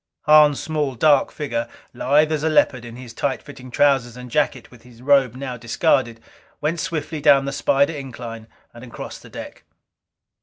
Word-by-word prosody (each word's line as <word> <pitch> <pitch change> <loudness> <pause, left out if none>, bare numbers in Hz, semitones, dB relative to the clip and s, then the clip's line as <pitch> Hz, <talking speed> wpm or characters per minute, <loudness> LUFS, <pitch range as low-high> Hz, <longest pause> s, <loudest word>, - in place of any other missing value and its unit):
Hahn's 150 -2 +6
small 150 -4 -2
dark 145 +3 +3
figure, 120 -5 -3 0.3
lithe 150 +4 +2
as 155 -2 -1
a 160 - +1
leopard 130 -5 +2
in 115 0 -9
his 125 -2 -10
tight 135 +3 -2
fitting 130 -3 -12
trousers 125 -2 +1
and 125 -1 -10
jacket - - -1
with 125 -2 -16
his 120 -2 -18
robe 135 -2 +3
now 130 -2 -6
discarded, 115 0 0 0.4
went 155 +3 -2
swiftly 160 -3 -4
down 140 -2 +5
the 140 - -3
spider 140 +2 +1
incline 120 -5 -8 0.3
and 120 - -12
across 120 - -9
the - - -15
deck. - - -10
135 Hz, 175 wpm, -21 LUFS, 120-150 Hz, 0.4 s, Hahn's